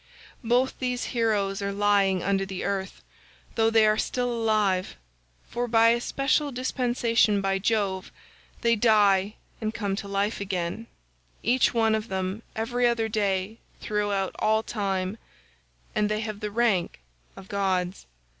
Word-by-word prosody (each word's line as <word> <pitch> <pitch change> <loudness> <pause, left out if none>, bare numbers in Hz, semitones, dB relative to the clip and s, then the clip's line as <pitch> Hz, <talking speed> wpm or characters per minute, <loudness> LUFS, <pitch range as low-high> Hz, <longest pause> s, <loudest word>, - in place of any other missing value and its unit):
Both 245 +3 +1
these 250 -1 -2
heroes 210 -4 0
are 200 0 -2
lying 200 -2 +2
under 195 0 +1
the 190 -1 -5
earth, 195 0 -3 0.5
though 225 -1 +3
they 225 -1 +5
are 215 0 +3
still 245 -1 -1
alive, 215 -5 +1 0.5
for 245 +1 -3
by 225 0 +5
a 235 +1 +2
special 275 +3 0
dispensation 240 -5 +1
of 195 0 0
Jove, 200 -3 0 0.5
they 235 0 +3
die 205 -3 +3 0.3
and 220 0 -2
come 200 -3 -1
to 200 - -5
life 200 +2 -1
again, 190 +3 -3 0.6
each 245 +1 +2
one 225 -1 +3
of 220 0 -1
them 190 +2 -3
every 240 +2 +1
other 230 -2 0
day 200 0 -1 0.2
throughout 205 -2 -1
all 220 +1 +2
time, 195 -1 -2 0.7
and 210 0 +1
they 215 0 -1
have 215 -2 -5
the 210 0 -3
rank 205 - 0 0.4
of 190 - -12
gods. 190 -2 -1
210 Hz, 145 wpm, -26 LUFS, 195-230 Hz, 0.7 s, they